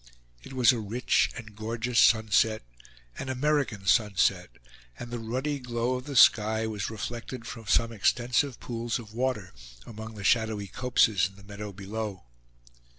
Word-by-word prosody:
It - - -11
was 125 -2 +5
a 120 - -2
rich 110 +4 +1
and 110 -2 -10
gorgeous 115 +2 -1
sunset 110 0 +4 0.6
an 130 - -5
American 130 -6 0
sunset; 100 -2 +2 0.5
and 120 - -8
the 120 - -3
ruddy 130 +6 -2
glow 120 0 -2
of 125 0 -4
the 145 -2 -6
sky 110 -1 +5
was 105 -2 -3
reflected 115 +2 -6
from 115 -3 -8
some 115 +1 +2
extensive 120 +4 +1
pools 115 -1 -3
of 110 -3 -11
water 115 -6 -2 0.3
among 110 0 -9
the 100 - -8
shadowy 110 -1 +1
copses 110 -3 +2
in 95 - -20
the 100 - -16
meadow 105 +1 -7
below. 100 0 -6
115 Hz, 150 wpm, -28 LUFS, 105-125 Hz, 0.6 s, was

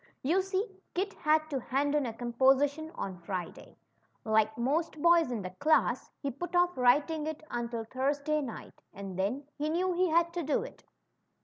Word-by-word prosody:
You 335 +8 +3
see 385 +3 -1 0.3
Kit 395 +3 -1
had 310 0 +2
to 275 - 0
hand 275 +3 0
in 295 -4 +1
a 230 - -4
composition 270 +6 +2
on 190 -2 -5
Friday. 180 0 -6 0.5
Like 220 0 +2
most 305 +6 0
boys 340 -2 +5
in 230 -5 -3
the 185 - -5
class, 305 +12 +2
he 280 - -1
put 350 +7 -6
off 355 0 +3
writing 295 +5 +3
it 310 -1 -5
until 235 -1 -3
Thursday 285 +5 -1
night, 250 -6 -8
and 195 -1 -7
then 205 +10 -1 0.2
he 300 +1 0
knew 360 +3 +1
he 365 +1 +2
had 335 +1 +2
to 350 - -2
do 305 +7 0
it. - - -11
285 Hz, 180 wpm, -30 LUFS, 240-330 Hz, 0.5 s, boys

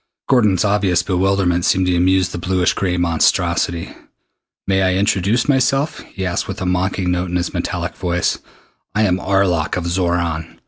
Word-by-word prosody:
Gordon's 105 -8 +3
obvious 100 -4 +1
bewilderment 95 -2 +1
seemed 95 +1 +2
to 90 -1 +1
amuse 90 +1 +2
the 90 - -6
bluish 90 0 +1
gray 90 -2 -1
monstrosity. 85 0 0 0.7
"May 95 0 +1
I 95 -1 +2
introduce 100 +4 +1
myself?" 135 +2 +1
he 95 - -4
asked 90 -2 -2
with - - -6
a 95 - -3
mocking 90 0 0
note 90 0 -1
in 90 - -3
his 90 -1 -2
metallic - - -3
voice. 90 0 -1 0.6
"I 110 - +2
am 95 -3 +1
Arlok 90 -5 0
of 90 - -2
Xoran. 85 -2 -2
90 Hz, 165 wpm, -18 LUFS, 90-95 Hz, 0.7 s, Gordon's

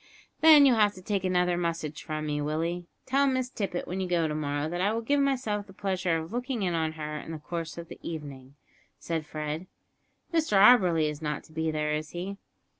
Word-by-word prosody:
"Then 310 -3 +8
you'll 255 -4 +5
have 205 -1 +4
to 185 - -11
take 200 -1 -1
another 180 -1 +2
message 165 -3 -3
from 155 0 -4
me, 150 -1 -1
Willie. 165 +4 -2 0.2
Tell 275 +2 +3
Miss 255 -1 0
Tippet 195 -7 -3
when 185 +2 -3
you 185 - -1
go 170 -2 +1
to 150 - -2
morrow 145 -1 -1
that 175 +2 -3
I 200 +3 +2
will 225 +1 -1
give 285 +5 +2
myself 250 -7 0
the 195 - -13
pleasure 185 -3 0
of 160 +5 -6
looking 245 -2 -2
in 180 -2 0
on 160 -1 0
her 150 -1 -5
in 160 - -8
the 160 - -4
course 165 +1 -5
of 170 0 -7
the - - -11
evening," 140 -4 -7 0.4
said 160 -3 -3
Fred. 155 +3 -4 0.7
"Mr 315 -11 +2
Auberly 185 -8 +6
is 150 0 -5
not 150 -1 -3
to - - -19
be 160 0 -1
there, 150 -1 -1
is 155 0 -3
he?" 190 +3 -5
175 Hz, 220 wpm, -28 LUFS, 155-205 Hz, 0.7 s, Then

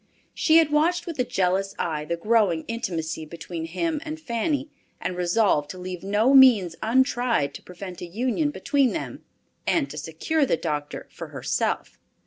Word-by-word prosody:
She 320 0 +4
had 320 -3 +4
watched 330 +4 +2
with 335 -5 -6
a - - +4
jealous 195 -2 0
eye 155 -3 -2
the 170 +2 -2
growing 205 -4 +2
intimacy 165 -8 -3
between 165 +1 -6
him 300 - -2
and 315 0 -6
Fanny, 285 +2 -2 0.3
and 180 - -3
resolved 175 -4 +2
to 185 - -7
leave 180 0 -6
no 210 +7 +2
means 230 -11 +7
untried 240 - +2
to - - -9
prevent 180 0 -9
a 175 - -5
union 250 - 0
between 280 -5 +1
them, 130 -4 -5 0.4
and - - +2
to 150 - -6
secure 165 - -1
the 255 - +2
doctor 150 -3 -4
for - - -8
herself. - - -2
200 Hz, 165 wpm, -25 LUFS, 170-270 Hz, 0.4 s, means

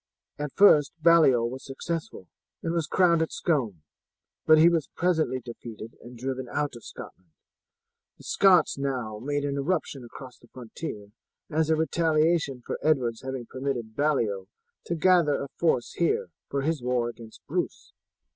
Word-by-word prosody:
At 150 -1 -3
first 155 -7 +6
Baliol 155 -8 +5
was 130 +2 -7
successful, 140 - -5 0.4
and 165 - -1
was 165 -3 -1
crowned 175 -2 +3
at 160 - -1
Scone, 115 - -1 0.6
but 155 - +8
he 160 +2 +7
was 165 -4 +1
presently 160 -7 +1
defeated 115 -2 -9
and 120 0 -12
driven 130 +1 -4
out 145 -3 -2
of 120 - -12
Scotland. 95 -2 -11 0.9
The - - -16
Scots 180 -7 +4
now 125 -6 -3
made 145 +4 -2
an 140 0 -2
eruption 145 -3 -2
across 125 +1 -11
the 120 - -20
frontier 110 -4 -8 0.4
as 155 0 +1
a 160 - +4
retaliation 155 -3 +1
for - - -4
Edward's 125 -7 +1
having 130 -2 -5
permitted 125 -4 -4
Baliol 110 -10 0 0.4
to 170 - -1
gather 170 -3 +4
a 140 - -5
force 145 -8 +1
here 165 - 0 0.2
for 140 -1 -2
his 155 -1 -1
war 125 -1 0
against 115 -2 -12
Bruce. - - -4
140 Hz, 155 wpm, -27 LUFS, 120-160 Hz, 0.9 s, but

